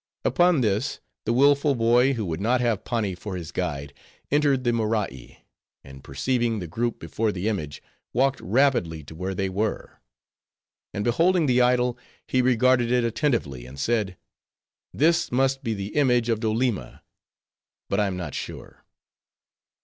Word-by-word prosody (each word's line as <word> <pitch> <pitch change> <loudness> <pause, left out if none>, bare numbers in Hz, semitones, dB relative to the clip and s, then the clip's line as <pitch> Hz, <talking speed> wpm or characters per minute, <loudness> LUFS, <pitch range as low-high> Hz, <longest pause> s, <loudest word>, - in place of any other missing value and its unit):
Upon 175 -5 +3
this, 110 +2 0 0.3
the 115 - +1
willful 140 +2 +4
boy 120 +3 +3
who 115 -5 -3
would 85 0 -4
not 120 +4 +2
have 115 -4 0
Pani 110 -5 -1
for 95 +2 -6
his 85 -3 -7
guide, 70 0 -3 0.4
entered 145 -3 +2
the 120 -1 +1
Morai; 105 - -3 0.4
and 65 0 -13
perceiving 115 - -1
the 90 - -4
group 115 +8 -2
before 110 -1 -2
the 95 +1 -3
image, 80 -10 -3 0.3
walked 135 +3 +1
rapidly 95 - +1
to 70 - -11
where 95 +4 -4
they 95 +1 -1
were. 100 +3 -3 0.9
And 105 - -3
beholding 165 - +3
the 125 -2 +3
idol, 125 0 +2 0.3
he 130 - +1
regarded 125 -1 +3
it 125 -1 +3
attentively, 115 - -1
and 65 +2 -11
said:—"This 115 - -2
must 135 +2 +1
be 115 -3 -1
the 100 +1 -6
image 125 -5 +3
of 115 -2 +1
Doleema; 110 - -1 0.8
but 100 - 0
I 105 - +2
am 95 -2 -3
not 85 -5 -5
sure." - - -8
115 Hz, 150 wpm, -25 LUFS, 95-130 Hz, 0.9 s, willful